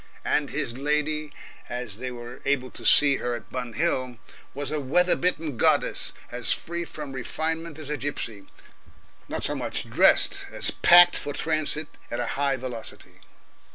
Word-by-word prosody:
And 145 -2 +1
his 135 -4 -3
lady, 150 +1 -1 0.4
as 125 -4 -5
they 130 +2 -5
were 120 +1 -9
able 135 -2 -1
to - - -2
see 140 -2 +7
her 120 -1 -2
at 110 - -11
Bun 125 -2 -5
Hill, 130 -6 -1 0.4
was 145 0 -3
a 155 - -1
weather 180 +7 +3
bitten 160 -7 +1
goddess, - - +2 0.2
as 120 -1 0
free 170 +1 -4
from 150 -4 -8
refinement 160 +4 -3
as 150 -2 -6
a 150 - -1
gipsy 115 -8 -5 0.8
not - - -4
so - - -1
much - - -4
dressed - - +3
as - - 0
packed 175 0 +7
for 145 - -3
transit 155 0 0 0.2
at 120 - -4
a 120 - -1
high 140 0 +1
velocity. 125 -3 -7
140 Hz, 160 wpm, -25 LUFS, 125-155 Hz, 0.8 s, see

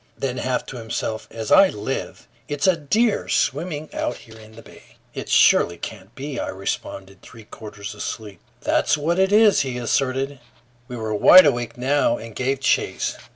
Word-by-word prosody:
Then, 130 -2 -3
half 130 -1 -2
to 130 - -8
himself, 110 -1 -4
"As 110 -2 -6
I 195 -1 +7
live, 105 +6 -5 0.2
it's 145 -1 -2
a 185 -2 +4
deer 210 +9 0
swimming 155 +1 -1
out 120 - -2
here 110 -1 -15
in 110 0 -15
the 115 - -13
bay!" - - -18 0.2
"It - - -7
surely 85 - +4
can't - - -9
be," 140 -1 -6
I - - -3
responded, 95 0 -6
three 115 - -14
quarters 105 -2 -9
asleep. 105 -2 -7 0.2
"That's - - +1
what 165 +5 -1
it 190 +1 +2
is!" 210 0 +5
he 130 -2 -2
asserted. 135 +3 -1 0.5
We 125 - -7
were 110 -1 -3
wide 180 - +8
awake 120 -5 -1
now 130 -1 +1
and 115 -1 -10
gave 135 +1 -1
chase. - - 0
130 Hz, 175 wpm, -22 LUFS, 110-145 Hz, 0.5 s, wide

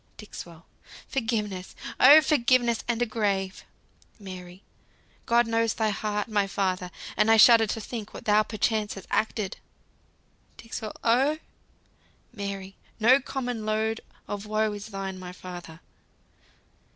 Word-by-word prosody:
"Dixwell. 170 -5 -10 0.4
Forgiveness! 215 -7 -2 0.2
Oh, 290 +5 +9
forgiveness, 250 -5 +2
and 240 0 +1
a - - +1
grave! 200 -4 -1 0.5
Mary. 185 -2 -10 0.6
God 235 +1 +4
knows 230 0 +1
thy 220 -1 +1
heart, 210 0 -2
my 205 -3 +1
father! 185 -2 -1 0.3
and 210 +1 +3
I 225 - +6
shudder 225 0 +8
To 225 - -3
think 220 -1 -6
what - - -10
thou 210 0 +5
perchance 215 0 -1
hast 195 - -9
acted. 215 -3 -1 1.0
Dixwell. 225 -1 -6
Oh! 265 +6 +3 1.0
Mary. 195 -3 -6 0.2
No 245 +5 +6
common 245 -4 -4
load 220 +1 -1 0.3
of 205 0 -5
woe 215 0 +1
is 205 +1 -7
thine, 195 -2 -5
my 180 -1 -7
father." 175 -3 -10
215 Hz, 125 wpm, -27 LUFS, 195-230 Hz, 1.0 s, Oh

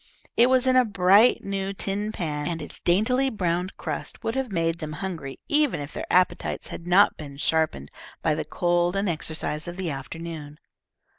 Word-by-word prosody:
It 240 +2 +5
was 260 0 +4
in 255 0 +3
a 255 - +7
bright 205 +2 +4
new 195 0 -3
tin 200 +2 -2
pan, 150 -7 -3
and 170 -1 -2
its 150 - -8
daintily 250 +9 +2
browned 180 -4 -2
crust - - -5
would 225 - -1
have 265 -4 -2
made 165 -2 0
them 155 -1 -5
hungry 155 -4 -5
even 295 - +2
if 145 +1 -7
their - - -5
appetites 180 0 +1
had 170 - -8
not 185 +3 +5
been 140 -2 -9
sharpened 155 - 0 0.3
by 155 - +3
the 155 +1 -2
cold 175 +3 +1
and 200 +1 0
exercise 155 -1 -1
of 175 +1 -6
the 185 -4 -2
afternoon. 150 +2 -7
175 Hz, 180 wpm, -25 LUFS, 155-205 Hz, 0.3 s, a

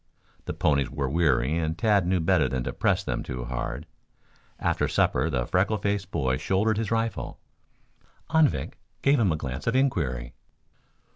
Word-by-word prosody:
The - - -4
ponies 70 -3 +2
were 70 -1 -2
weary 75 -2 +2
and 80 0 -2
Tad 105 -5 +3
knew 90 0 +2
better 80 -4 +2
than 65 0 -2
to - - -4
press - - +1
them - - -2
too 60 -1 -5
hard. - - -4 0.7
After - - 0
supper 80 - +1
the 65 -5 -1
freckle 100 - +1
faced 100 -1 -2
boy 65 -7 0
shouldered 105 +7 +1
his 115 - -2
rifle. 115 -2 -2 0.9
Anvik 150 - +2 0.2
gave 140 0 +4
him 100 -6 +3
a - - +1
glance 65 -2 -5
of 115 - +1
inquiry. 70 - 0
80 Hz, 160 wpm, -26 LUFS, 65-105 Hz, 0.9 s, gave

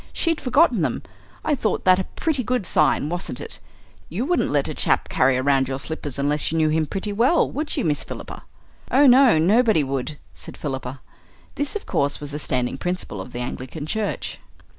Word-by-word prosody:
She'd 330 -2 0
forgotten 255 - +3
them. - - -1 0.4
I 310 - +2
thought 225 -7 -1
that 185 0 +6
a 190 - -2
pretty 295 -6 0
good 245 -3 -1
sign, 155 -2 +2
wasn't 175 -6 -4
it? - - -5 0.5
You 210 +10 -2
wouldn't 350 +4 +1
let - - +1
a - - -3
chap - - +1
carry 130 0 +3
round 135 0 +2
your 135 0 -3
slippers 145 -1 -5
unless 145 +2 +1
you 165 - -1
knew 155 -1 +3
him 155 0 +1
pretty 205 +3 -3
well, 250 +11 +3
would 300 +2 -3
you, - - 0
Miss 150 -3 0
Philippa?" - - -8 0.5
"Oh 280 +2 +5
no, 255 - +7
nobody 210 +1 +4
would," 135 +2 -3 0.2
said - - -10
Philippa. 130 -2 -5 0.5
This 285 +5 -3
of 420 - -4
course, 140 0 +1
was 145 -1 -6
a 150 - -3
standing 130 -2 -1
principle 180 +1 -4
of - - -9
the 120 - -5
Anglican 130 +4 -6
Church. 215 +5 -3
160 Hz, 195 wpm, -23 LUFS, -, 0.5 s, no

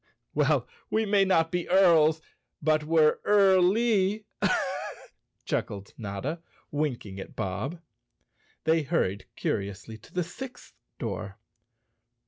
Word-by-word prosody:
"Well, - - +2 0.2
we 220 0 +1
may 200 -1 +4
not 165 -4 +3
be 175 -1 -2
earls, 165 -4 +5 0.4
but 155 0 +2
we're 155 0 +4
early," 200 +1 +4 1.2
chuckled 100 -1 -3
Notta, 115 - -4 0.3
winking 125 -10 -2
at - - -9
Bob. 110 - -3 0.8
They 160 +1 +3
hurried 130 - -1
curiously 100 +3 -3
to - - -18
the 180 - 0
sixth 250 +9 -9 0.2
door. 100 -3 -5
160 Hz, 105 wpm, -28 LUFS, -, 1.2 s, earls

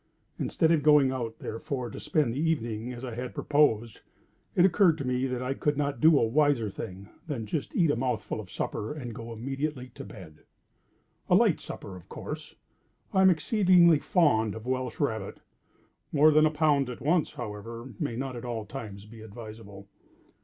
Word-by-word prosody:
Instead 160 -2 +1
of 160 -3 +3
going 145 -3 +5
out 120 -4 -4
therefore 120 +2 -5
to - - -7
spend 150 -5 0
the 135 - -3
evening 120 -8 -1
as 125 +1 -7
I 125 - -6
had 125 +2 -6
proposed, 120 -7 +2 0.6
it 180 - +6
occurred 180 -3 +4
to 140 - -4
me 125 +1 0
that 125 -1 -3
I 130 +1 -1
could 145 +1 -1
not 140 -4 -1
do 160 -1 +7
a 115 - +3
wiser 130 -3 +2
thing 95 -2 -8 0.2
than 130 -8 -3
just 140 +7 -4
eat 165 -5 +4
a - - +1
mouthful 125 +1 -2
of - - -8
supper 110 +8 -4
and 125 -6 -6
go 115 0 -8
immediately 135 +3 -4
to 120 - -10
bed. 80 -7 -12 0.9
A - - +6
light - - +4
supper 95 - -8
of 90 - -14
course. - - -7 0.6
I 190 - +4
am 190 - +7
exceedingly 180 -2 +5
fond 110 - +2
of 110 0 -8
Welsh 130 -2 -2
rabbit. - - -2 0.7
More 155 +1 +6
than 155 +1 +5
a - - +2
pound 150 -3 +2
at 125 - -7
once, 160 +3 +1
however, 115 +2 -7
may 115 - -2
not 130 +1 -4
at 120 - -7
all 115 -3 -4
times 105 -4 -8
be 110 +1 -13
advisable. 110 -2 -10
125 Hz, 185 wpm, -28 LUFS, 115-150 Hz, 0.9 s, do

